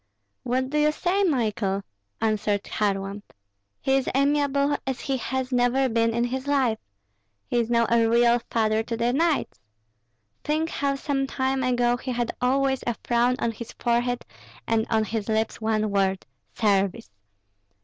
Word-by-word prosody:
"What 260 Hz, +1 st, -1 dB
do 300 Hz, -, +1 dB
you 300 Hz, 0 st, +4 dB
say, 370 Hz, +5 st, 0 dB
Michael?" 205 Hz, -, 0 dB, 0.4 s
answered 210 Hz, -2 st, 0 dB
Kharlamp. 200 Hz, -1 st, -2 dB, 0.6 s
"He 270 Hz, 0 st, +2 dB
is 265 Hz, -, -1 dB
amiable 280 Hz, 0 st, +2 dB
as 265 Hz, -1 st, -2 dB
he 270 Hz, -2 st, -1 dB
has 260 Hz, +1 st, -3 dB
never 250 Hz, +2 st, +2 dB
been 230 Hz, 0 st, +2 dB
in 235 Hz, +1 st, 0 dB
his 260 Hz, +3 st, -3 dB
life. 260 Hz, -6 st, +2 dB, 0.7 s
He 240 Hz, -, 0 dB
is 230 Hz, -1 st, -1 dB
now 235 Hz, -1 st, +3 dB
a 230 Hz, -1 st, +3 dB
real 235 Hz, +1 st, +4 dB
father 220 Hz, -1 st, +1 dB
to 230 Hz, +1 st, -4 dB
the 235 Hz, +1 st, +1 dB
knights. 315 Hz, -, 0 dB, 0.8 s
Think 310 Hz, +2 st, 0 dB
how 280 Hz, -1 st, 0 dB
some 275 Hz, -1 st, -1 dB
time 265 Hz, 0 st, -1 dB
ago 245 Hz, -1 st, +2 dB
he 255 Hz, +1 st, -5 dB
had 240 Hz, -1 st, -1 dB
always 265 Hz, +1 st, +1 dB
a 240 Hz, -, 0 dB
frown 240 Hz, +1 st, +2 dB
on 235 Hz, -, -1 dB
his 230 Hz, +1 st, -9 dB
forehead, 245 Hz, +1 st, 0 dB, 0.4 s
and 225 Hz, -1 st, +1 dB
on 220 Hz, -1 st, +2 dB
his 215 Hz, 0 st, -3 dB
lips 220 Hz, +1 st, -1 dB
one 215 Hz, -1 st, 0 dB
word, 195 Hz, -1 st, 0 dB, 0.3 s
'Service.' 195 Hz, -, +1 dB
240 Hz, 160 wpm, -25 LUFS, 220-270 Hz, 0.8 s, you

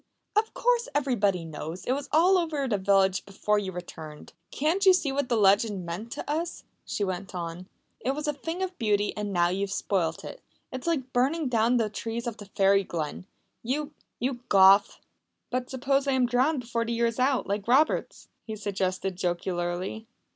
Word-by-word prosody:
"Of 440 Hz, +3 st, +1 dB
course -, -, +1 dB
everybody 205 Hz, -11 st, +1 dB
knows! 160 Hz, +3 st, -6 dB
It -, -, 0 dB
was 280 Hz, +2 st, -2 dB
all 345 Hz, +5 st, +5 dB
over 305 Hz, -5 st, -1 dB
the 210 Hz, -5 st, 0 dB
village 190 Hz, -1 st, +3 dB
before 210 Hz, +1 st, 0 dB
you 195 Hz, -2 st, -4 dB
returned. 160 Hz, -4 st, -9 dB, 0.2 s
"Can't 325 Hz, +7 st, 0 dB
you 380 Hz, -1 st, +8 dB
see 320 Hz, -6 st, +1 dB
what 275 Hz, -2 st, -1 dB
that 240 Hz, -, +2 dB
legend 200 Hz, -2 st, +3 dB
meant 185 Hz, +8 st, -6 dB
to -, -, -7 dB
us?" 325 Hz, +3 st, -2 dB, 0.2 s
she 205 Hz, -, -3 dB
went 190 Hz, 0 st, -4 dB
on. 175 Hz, +1 st, -5 dB, 0.3 s
"It 265 Hz, +2 st, -1 dB
was 300 Hz, +1 st, -4 dB
a 295 Hz, -, +1 dB
thing 325 Hz, +6 st, -4 dB
of 370 Hz, -1 st, -4 dB
beauty. 210 Hz, -2 st, +1 dB
And 210 Hz, -1 st, -3 dB
now 175 Hz, -2 st, +3 dB
you 185 Hz, +2 st, -2 dB
have 200 Hz, -1 st, -2 dB
spoilt 170 Hz, -6 st, -1 dB
it. -, -, -9 dB, 0.3 s
It's 260 Hz, +5 st, -6 dB
like 270 Hz, -6 st, -1 dB
burning 275 Hz, +4 st, +1 dB
down 235 Hz, +1 st, +3 dB
the 225 Hz, -2 st, +1 dB
trees 225 Hz, +3 st, -4 dB
of 235 Hz, -2 st, -4 dB
the 205 Hz, -, -10 dB
Fairy 195 Hz, 0 st, +3 dB
Glen. 170 Hz, +1 st, -5 dB, 0.3 s
You 290 Hz, +5 st, -2 dB, 0.3 s
you 250 Hz, +1 st, -1 dB
Goth!" 195 Hz, +1 st, +6 dB, 0.5 s
"But 250 Hz, 0 st, -2 dB
suppose 275 Hz, +1 st, 0 dB
I 275 Hz, -, +2 dB
am 260 Hz, -1 st, +3 dB
drowned 255 Hz, +4 st, +2 dB
before 235 Hz, -1 st, -2 dB
the 230 Hz, 0 st, -2 dB
year 235 Hz, 0 st, +1 dB
is 230 Hz, +1 st, -1 dB
out 260 Hz, 0 st, +2 dB
like 200 Hz, +1 st, -3 dB
Roberts?" 275 Hz, +6 st, +2 dB, 0.2 s
he 220 Hz, -, -4 dB
suggested 190 Hz, -2 st, -2 dB
jocularly. 175 Hz, +3 st, -2 dB
225 Hz, 190 wpm, -27 LUFS, 195-275 Hz, 0.5 s, you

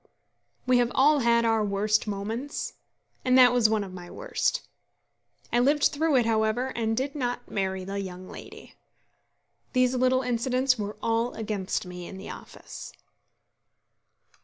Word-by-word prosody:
We 250 Hz, -1 st, +4 dB
have 240 Hz, 0 st, +1 dB
all 290 Hz, +2 st, +5 dB
had 235 Hz, -1 st, +3 dB
our 225 Hz, -1 st, +2 dB
worst 210 Hz, +2 st, +1 dB
moments, 220 Hz, +7 st, -4 dB, 0.5 s
and 255 Hz, 0 st, +4 dB
that 250 Hz, -1 st, +7 dB
was 240 Hz, -3 st, +4 dB
one 215 Hz, -2 st, +1 dB
of 190 Hz, -2 st, -9 dB
my 175 Hz, -1 st, -9 dB
worst. -, -, -2 dB, 0.9 s
I 240 Hz, -, +4 dB
lived 285 Hz, +4 st, +3 dB
through 315 Hz, 0 st, +2 dB
it, 245 Hz, -3 st, +4 dB
however, 225 Hz, +3 st, +1 dB
and 225 Hz, -1 st, -1 dB
did 275 Hz, +2 st, -1 dB
not 245 Hz, -4 st, -3 dB
marry 190 Hz, -1 st, -2 dB
the 200 Hz, +1 st, -4 dB
young 185 Hz, -1 st, -8 dB
lady. -, -, -11 dB, 1.0 s
These 255 Hz, -1 st, +3 dB
little 255 Hz, +1 st, +2 dB
incidents 255 Hz, +1 st, +1 dB
were 205 Hz, 0 st, -4 dB
all 230 Hz, +2 st, 0 dB
against 210 Hz, -2 st, -3 dB
me 180 Hz, -1 st, -8 dB
in 190 Hz, -, -9 dB
the 190 Hz, -, -8 dB
office. -, -, -10 dB
230 Hz, 150 wpm, -27 LUFS, 205-255 Hz, 1.0 s, that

